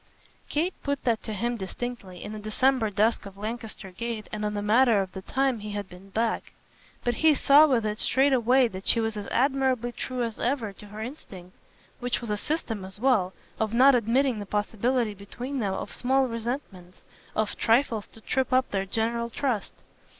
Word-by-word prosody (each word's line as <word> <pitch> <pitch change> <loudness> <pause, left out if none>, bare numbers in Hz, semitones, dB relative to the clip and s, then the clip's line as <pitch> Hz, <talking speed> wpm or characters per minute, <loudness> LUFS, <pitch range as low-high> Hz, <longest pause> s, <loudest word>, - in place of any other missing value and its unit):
Kate 335 +5 0
put 280 -1 -2
that 230 -3 +1
to 220 - -6
him 235 +3 -1
distinctly, 195 -2 -6
in - - -6
the 215 - -6
December 225 +2 +2
dusk 215 +1 +1
of 195 0 -12
Lancaster 215 -2 -6
Gate 225 +2 -4
and 215 0 -4
on 210 0 -1
the 205 - -1
matter 225 +1 +5
of 190 -1 -2
the 190 - -7
time 265 +2 0
he 210 0 -6
had 205 -1 -4
been 185 +2 -14
back; 225 +3 -1 0.5
but 240 -1 0
he 315 -2 +5
saw 290 +3 +7
with 245 -6 +2
it 210 0 -2
straightway 260 -1 +4
that 190 -3 -8
she 230 - +5
was 225 -1 -1
as 205 -1 -5
admirably 260 -2 +1
true 250 0 -3
as 230 -2 -4
ever 235 -5 -1
to 210 - -13
her 210 +1 -8
instinct 195 - -9 0.4
which 245 0 -1
was 235 -3 -5
a - - +2
system 225 - -3
as 190 +2 -8
well 220 -8 +3 0.3
of 220 +1 0
not 270 +3 +7
admitting 245 +1 +2
the 205 - -5
possibility 220 +3 0
between 245 +7 -6
them 195 -4 0
of - - -5
small 265 +2 +2
resentments, 230 -7 -5 0.4
of 215 -1 0
trifles 230 -2 +2
to 225 - -16
trip 260 +4 0
up 260 0 +3
their 195 -1 0
general 235 +3 -1
trust. 235 -4 -1
230 Hz, 195 wpm, -27 LUFS, 210-255 Hz, 0.5 s, saw